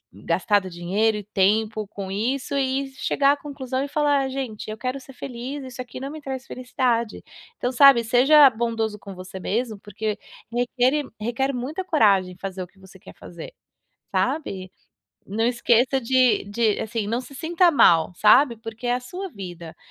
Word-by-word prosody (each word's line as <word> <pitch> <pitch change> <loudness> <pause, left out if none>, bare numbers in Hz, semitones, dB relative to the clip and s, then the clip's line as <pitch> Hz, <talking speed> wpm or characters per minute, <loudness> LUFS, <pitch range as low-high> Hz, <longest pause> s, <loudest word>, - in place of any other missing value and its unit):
gastado 205 -4 0
dinheiro 195 +6 0
e 210 - -6
tempo 210 +2 +1
com 195 -1 -7
isso 250 +8 -2
e 270 0 0
chegar 280 0 +2
à - - +2
conclusão 270 -3 -4
e 285 - -3
falar: 285 -2 +1
"Gente 260 -6 -5
eu 215 - -5
quero 255 +3 -3
é - - -8
ser 270 - -14
feliz, 260 +2 -6
isso 255 -1 -7
aqui 250 0 -9
não 275 +1 -5
me 310 0 -8
traz 265 -2 -6
felicidade". 245 -3 -2 0.3
Então, 245 - -1
sabe, 260 -2 +7
seja 270 +6 +6
bondoso 225 -2 -2
com 200 -2 -10
você 185 +1 -9
mesmo, 220 +3 -2
porque 210 +1 -4 0.3
requer 250 +4 +1 0.2
requer 240 +5 -1
muita 275 +8 -4
coragem 200 - +3
em 180 - -18
fazer 190 0 -6
o 180 - -6
que 195 - -31
você 190 0 -16
quer - - -14
fazer, 170 - -11 0.6
sabe. 190 -12 -2 0.6
Não 215 +3 -1
esqueça 245 +2 +2
de 255 -1 +3
de, 210 +1 0
assim, 220 -1 -3
não 230 +3 -1
se 270 +2 -13
sinta 340 +4 +2
mal, 165 - +5
sabe, 235 +5 +5
porque 225 +2 -8
é 245 - +2
a 250 - -2
sua 365 +10 -7
vida, 175 - -9
235 Hz, 180 wpm, -23 LUFS, 205-270 Hz, 0.6 s, sabe